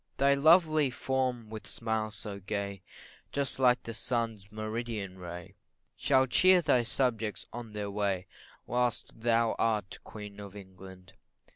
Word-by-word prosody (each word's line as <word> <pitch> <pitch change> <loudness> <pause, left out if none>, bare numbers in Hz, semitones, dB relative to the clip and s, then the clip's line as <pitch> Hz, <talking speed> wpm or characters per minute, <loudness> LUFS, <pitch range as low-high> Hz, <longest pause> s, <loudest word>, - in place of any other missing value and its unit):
Thy 140 +1 +5
lovely 155 0 +5
form, 125 -3 -2
with 110 -1 -7
smiles 110 -1 -2
so 100 -1 -7
gay, 100 0 -4 0.5
Just 140 -2 -1
like 125 -1 +4
the 115 - -6
sun's 115 -4 -3
meridian 110 -3 -4
ray, 90 -1 -8 0.4
Shall 130 -1 +3
cheer 185 +8 +6
thy 140 -5 +4
subjects 115 -5 -1
on 115 -2 -7
their 105 -1 -3
way, 100 -3 -1 0.4
Whilst 120 -1 0
thou 115 0 +2
art 105 -4 0
Queen 105 -1 -9
of 100 -1 -9
England. 95 -1 -12
110 Hz, 135 wpm, -30 LUFS, 100-125 Hz, 0.5 s, cheer